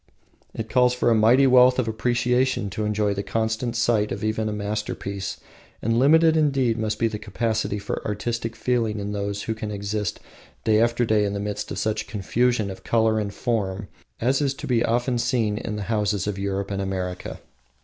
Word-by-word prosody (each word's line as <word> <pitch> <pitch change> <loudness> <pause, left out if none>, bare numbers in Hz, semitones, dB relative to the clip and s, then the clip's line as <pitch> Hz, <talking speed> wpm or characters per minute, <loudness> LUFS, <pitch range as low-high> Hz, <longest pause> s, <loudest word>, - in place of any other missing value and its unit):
It 110 - -4
calls 125 +1 +3
for 120 -1 +2
a - - +6
mighty 115 +5 +5
wealth 125 -1 +6
of 130 -3 0
appreciation 120 0 0
to 105 +2 -2
enjoy 105 -1 +1
the 100 - -2
constant 110 +3 -2
sight 115 -3 +1
of 100 +1 -4
even 110 0 0
a - - -2
masterpiece, 100 -1 -4 0.4
and 115 +1 +1
limitless 160 +4 +5
indeed 135 -7 +2
must 110 -1 -1
be 115 - +2
the 110 -1 -4
capacity 110 0 -1
for 100 0 -4
artistic 115 +2 -3
feeling 115 -4 0
in 100 0 -4
those 100 0 -3
who 110 - -2
can 110 -1 -5
exist 105 -1 -3 0.4
day 110 0 +3
after 120 +1 +2
day 110 -2 +2
in 100 -1 -1
the 100 - -3
midst 105 0 -4
of - - -5
such 110 -1 -1
confusion 110 +1 0
of 95 - -10
color 110 -1 +2
and 100 -1 -4
form 100 -5 -2 0.3
as 130 +5 +1
is 140 -2 0
to - - -7
be 120 -2 +2
often 120 +1 0
seen 115 -4 0
in 105 - -4
the 105 - -4
homes 105 -2 0
of 100 -1 -3
Europe 100 0 -2
and 100 0 -2
America. 90 -2 -4
110 Hz, 195 wpm, -24 LUFS, 105-120 Hz, 0.4 s, a